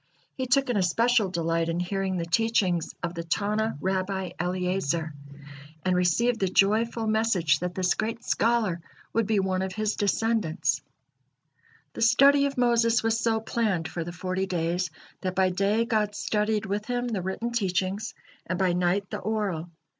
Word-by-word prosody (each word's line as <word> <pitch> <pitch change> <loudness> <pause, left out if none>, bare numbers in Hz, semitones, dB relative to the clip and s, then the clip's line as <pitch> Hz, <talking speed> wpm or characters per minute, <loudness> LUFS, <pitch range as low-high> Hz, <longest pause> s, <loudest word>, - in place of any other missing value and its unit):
He 260 -1 -4
took 275 +2 +3
an 230 - 0
especial 220 +3 +2
delight 165 -1 0
in 165 +1 -1
hearing 190 +1 -1
the 170 - -2
teachings 185 -4 +1
of 175 -1 -2
the 170 -1 -5
Tanna 210 +4 -1
Rabbi 190 0 -2
Eliezer, 180 -3 -1 0.7
and 185 -1 +2
received 220 +7 +2
the 195 - +1
joyful 220 +5 +2
message 215 -9 +2
that 180 0 -4
this 185 -1 +2
great 225 +1 -3
scholar 220 -7 +1 0.3
would 225 -3 +1
be 215 -2 +2
one 190 -1 0
of 190 -1 -3
his 215 0 -1
descendants. 205 -4 0 1.1
The - - -7
study 275 +5 +5
of 275 - -6
Moses 235 -2 +3
was 225 0 +1
so 225 -1 +1
planned 215 -7 -1
for 170 - -4
the 175 - -6
forty 185 +2 -2
days, 175 0 -1 0.3
that 185 -1 -3
by 190 -1 +3
day 200 +5 +1
God 215 -3 0
studied 210 0 0
with 205 +1 -2
him 245 +1 -2
the 210 -5 -2
written 190 +6 -3
teachings, 195 -2 -1 0.3
and 180 - -1
by 185 -1 +2
night 180 +3 +1
the - - -3
oral. 195 -5 -2
195 Hz, 165 wpm, -26 LUFS, 180-225 Hz, 1.1 s, study